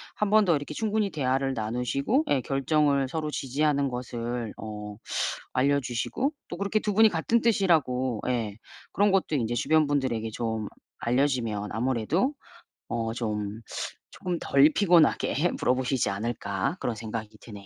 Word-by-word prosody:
1 210 - 0
번 215 0 +5
더 170 -3 +4
이렇게 145 +1 -4
충분히 215 +3 0
대화를 135 -2 0
나누시고 125 - 0
예 135 - +3
결정을 140 +1 +2
서로 155 +2 -3
지지하는 140 +1 0
것을 120 -2 -4
어 105 -1 -7 0.6
알려주시고 140 - 0 0.2
또 175 - -5
그렇게 200 +3 0
2 210 -1 -1
분이 220 +2 +6
같은 210 +7 +1
뜻이라고 145 - +2
예 115 -5 -1 0.4
그런 205 0 +3
것도 190 -5 +1
인제 120 -3 0
주변 155 +5 +3
분들에게 130 -6 0
좀 110 -1 -3 0.3
알려지면 120 -5 0
아무래도 130 - 0 0.6
어 115 -1 -2
좀 105 -2 -3 0.5
쪼금 180 -1 -3
덜 140 +3 +5
피곤하게 175 -3 +3
물어보시지 130 -2 +1
않을까 100 - -2
그런 120 - -2
생각이 110 0 -5
드네요. 100 -3 -11
130 Hz, 315 characters per minute, -27 LUFS, 115-160 Hz, 0.6 s, 분이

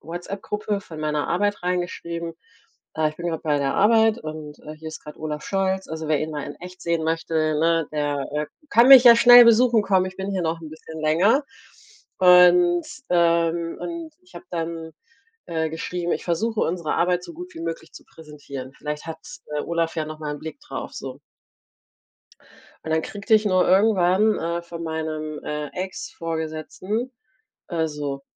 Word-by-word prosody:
Whatsapp-Gruppe 200 +5 -4
von 160 -5 -10
meiner 150 -1 -1
Arbeit 205 +2 0
reingeschrieben: 170 -2 -3 0.6
„Äh, 155 -1 +1
ich 155 - -17
bin 170 +1 -4
grad 160 -2 -4
bei 150 -2 +1
der 135 -1 -1
Arbeit 220 +2 +4
und, 155 -1 -8
äh, 155 - -9
hier 160 +1 -9
ist 155 - -9
grad 150 - -11
Olaf 150 -1 -5
Scholz. 190 -1 -1
Also, 160 0 -5
wer 155 -2 +2
ihn 155 - -3
mal 150 -2 -4
in 145 - -7
echt 180 +1 -10
sehen 170 -1 0
möchte, 165 0 -2 0.3
ne? 165 -1 +2
Der, 145 -2 -1
äh, 150 0 -1 0.2
kann 235 +2 +6
mich 265 -2 +11
ja 235 -1 +9
schnell 245 +1 +9
besuchen 230 -1 +5
kommen. 190 -2 +2
Ich 185 - -8
bin 190 +1 -4
hier 190 -2 -1
noch 165 0 -2
'n 160 -2 -9
bisschen 160 0 -10
länger.“ 180 - +3 0.7
Und 180 -1 +6 0.2
ähm, 170 -1 +2
und 335 -1 -6
ich 360 - -23
habe - - -10
dann, 165 -1 -4 0.6
äh, 160 -1 -1
geschrieben: 175 +2 -3
„Ich - - -3
versuche 215 +6 -1
unsere 170 -2 -1
Arbeit 180 0 +1
so - - -9
gut 360 +2 -10
wie - - -8
möglich 165 0 -6
zu - - -13
präsentieren. 145 -4 -10
Vielleicht 150 +2 -6
hat, 160 0 -6 0.4
äh, 145 - -1
Olaf 170 0 -2
ja 155 - -1
noch 155 0 -8
mal 150 -1 -3
'n - - -8
Blick 160 - -8
drauf 295 - -7
so." - - -7 1.7
Und 160 - -4
dann 160 0 +2
kriegte 205 +4 -2
ich 215 0 +5
nur 185 -2 +3
irgendwann, 195 +1 +3
äh, 170 +1 -2
von 170 -1 -8
meinem, 155 -1 -4
äh, 150 0 -4
Ex-Vorgesetzten, 170 - -4 0.6
äh, 165 -2 0
so: 145 -2 -5
170 Hz, 180 wpm, -23 LUFS, 155-190 Hz, 1.7 s, mich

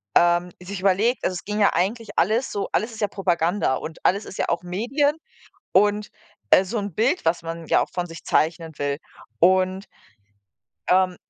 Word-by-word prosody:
ähm, 175 +1 +4
sich 190 +2 -6
überlegt 200 +6 +2
also, 185 - 0
es 180 - -6
ging 210 +1 -2
ja 205 - +4
eigentlich 205 +6 -1
alles 220 +9 +2
so 200 - -3
alles 220 +3 0
ist 220 -1 -9
ja 210 - +2
Propaganda 175 -5 0
und 160 +4 -7
alles 200 +3 +2
ist - - -9
ja - - -1
auch 170 +1 -1
Medien 245 +12 0 0.6
und, 205 +2 +3 0.4
äh, 185 - +6
so 215 +4 -3
'n 200 -4 -4
Bild, 260 +11 +1
was 165 +1 +1
man 165 0 -6
ja - - +3
auch - - -6
von 175 -1 -2
sich 165 -1 -11
zeichnen 160 +1 0
will 145 0 -1 0.4
und 185 +2 +3 1.0
Ähm, 185 0 +3
185 Hz, 185 wpm, -23 LUFS, 175-210 Hz, 1.0 s, äh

